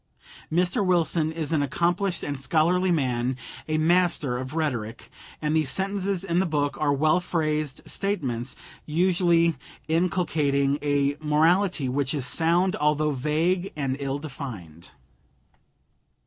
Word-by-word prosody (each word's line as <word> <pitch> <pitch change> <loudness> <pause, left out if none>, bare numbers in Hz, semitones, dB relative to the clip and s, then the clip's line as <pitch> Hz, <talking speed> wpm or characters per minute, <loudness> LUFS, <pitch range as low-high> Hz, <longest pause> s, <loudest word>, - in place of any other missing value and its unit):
Mr. 180 +4 +1
Wilson 170 -3 +2
is 160 -1 -3
an 155 -3 +2
accomplished 175 +6 0
and 145 -2 -3
scholarly 170 +6 +2
man, 130 -6 0 0.3
a 155 0 0
master 165 -5 +2
of 130 +4 -6
rhetoric, 125 -9 -3 0.3
and 150 +1 +1
the 160 - +3
sentences 190 +6 -1
in 175 -2 0
the 190 - +1
book 145 -3 0
are 150 -2 +2
well 155 +4 +3
phrased 155 -5 -2
statements, 135 - -2 0.3
usually 170 0 +2 0.3
inculcating 155 -5 +1
a 145 -1 +1
morality 160 +1 +2
which 140 +3 -1
is 135 -4 -2
sound 170 +7 +2
although 150 0 +1
vague 160 +7 0
and 135 -3 -1
ill 140 0 -2
defined. 120 - -8
155 Hz, 125 wpm, -25 LUFS, 140-175 Hz, 0.3 s, the